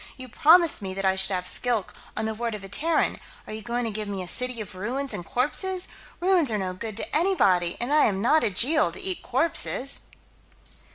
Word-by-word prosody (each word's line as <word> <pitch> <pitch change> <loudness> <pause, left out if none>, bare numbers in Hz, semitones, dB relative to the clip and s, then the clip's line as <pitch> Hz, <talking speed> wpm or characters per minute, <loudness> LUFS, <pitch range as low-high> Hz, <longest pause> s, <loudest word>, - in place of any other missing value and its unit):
"You 260 -1 -9
promised 325 +5 +4
me 190 -1 -5
that 195 0 -3
I 190 0 +3
should 190 0 +2
have 180 0 -3
Skilk, 235 0 -1 0.2
on - - -1
the 220 - -2
word 230 0 -3
of 205 - -9
a - - -8
Terran. 315 +12 0 0.3
Are - - -8
you 220 - -6
going 240 +1 -2
to 225 - -2
give 215 0 -4
me 195 -2 -4
a - - -9
city 250 +4 -2
of 210 -4 -7
ruins 250 +9 -3
and 175 - -5
corpses? 360 - -1 0.3
Ruins 355 -7 +3
are 215 - 0
no 185 -2 -3
good 215 +3 -7
to - - -4
anybody, 200 - +2
and 245 +5 -1
I 305 - +5
am 195 -3 0
not 300 +9 +3
a - - +2
Jeel, 285 - +3
to - - -9
eat 380 -2 -3
corpses." 275 -4 +1
235 Hz, 225 wpm, -25 LUFS, 195-300 Hz, 0.3 s, I